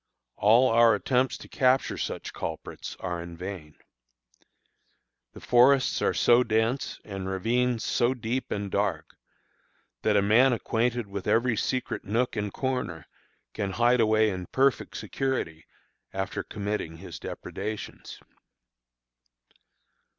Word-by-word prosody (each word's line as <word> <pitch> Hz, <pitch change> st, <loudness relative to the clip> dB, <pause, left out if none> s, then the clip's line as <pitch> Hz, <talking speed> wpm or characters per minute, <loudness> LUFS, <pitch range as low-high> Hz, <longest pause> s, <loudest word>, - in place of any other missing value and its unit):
All 115 Hz, +6 st, +5 dB
our 115 Hz, -1 st, +5 dB
attempts 130 Hz, 0 st, +1 dB
to -, -, -12 dB
capture 130 Hz, 0 st, +2 dB
such -, -, -4 dB
culprits -, -, -6 dB
are 90 Hz, -2 st, -3 dB
in 85 Hz, 0 st, -9 dB
vain. 90 Hz, -5 st, -7 dB, 1.6 s
The -, -, -11 dB
forests 130 Hz, +2 st, +4 dB
are -, -, +1 dB
so 120 Hz, +1 st, +5 dB
dense, 115 Hz, +3 st, 0 dB
and 95 Hz, -2 st, -5 dB
ravines 115 Hz, +5 st, 0 dB
so 120 Hz, +2 st, +1 dB
deep 125 Hz, +2 st, -3 dB
and 100 Hz, -1 st, -3 dB
dark, 100 Hz, -6 st, -1 dB, 0.9 s
that 105 Hz, -1 st, +2 dB
a 100 Hz, -, +3 dB
man 120 Hz, +6 st, +5 dB
acquainted 120 Hz, 0 st, 0 dB
with 100 Hz, -1 st, -6 dB
every 115 Hz, +1 st, +2 dB
secret 125 Hz, +4 st, -2 dB
nook 115 Hz, +5 st, 0 dB
and 105 Hz, -2 st, -2 dB
corner, 125 Hz, -, -3 dB, 0.5 s
can 100 Hz, -3 st, -3 dB
hide 120 Hz, +3 st, +3 dB
away 110 Hz, -1 st, +3 dB
in 90 Hz, -2 st, -5 dB
perfect 135 Hz, 0 st, +1 dB
security, 130 Hz, -, -3 dB, 0.5 s
after 95 Hz, 0 st, -3 dB
committing 100 Hz, -6 st, -4 dB
his 90 Hz, -1 st, -9 dB
depredations. 105 Hz, +2 st, -6 dB
110 Hz, 120 wpm, -27 LUFS, 95-125 Hz, 1.6 s, All